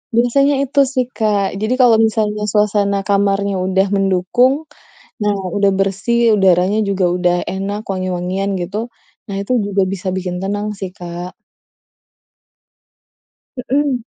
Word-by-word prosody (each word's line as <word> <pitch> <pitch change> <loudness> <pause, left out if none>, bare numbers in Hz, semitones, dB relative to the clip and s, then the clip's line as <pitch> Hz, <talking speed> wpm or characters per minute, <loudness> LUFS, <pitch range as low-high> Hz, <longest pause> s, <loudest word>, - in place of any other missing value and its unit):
Biasanya 275 +4 +3
itu 280 +1 -1
sih, 255 -1 +1
Kak. 210 -3 +1 0.2
Jadi 215 +3 0
kalau 235 -3 +6
misalnya 210 -1 -1
suasana 205 -1 +2
kamarnya 200 0 +1
udah 190 +1 +2
mendukung, 195 +6 +2 0.7
nah 210 0 +2 0.2
udah 200 -1 +3
bersih, 215 +4 +2
udaranya 190 +2 +3
juga 195 -2 +1
udah 180 -1 +2
enak, 200 +2 -3
wangi-wangian 185 +1 -2
gitu, 185 +4 -4 0.5
nah 200 - -5
itu 200 - -5
juga 200 -1 0
bisa 190 0 -6
bikin 180 -1 -3
tenang 205 +1 -2
sih, 190 -2 -5
Kak. 175 +1 -7 2.2
Heeh. 260 0 -1
200 Hz, 125 wpm, -17 LUFS, 190-220 Hz, 2.2 s, kalau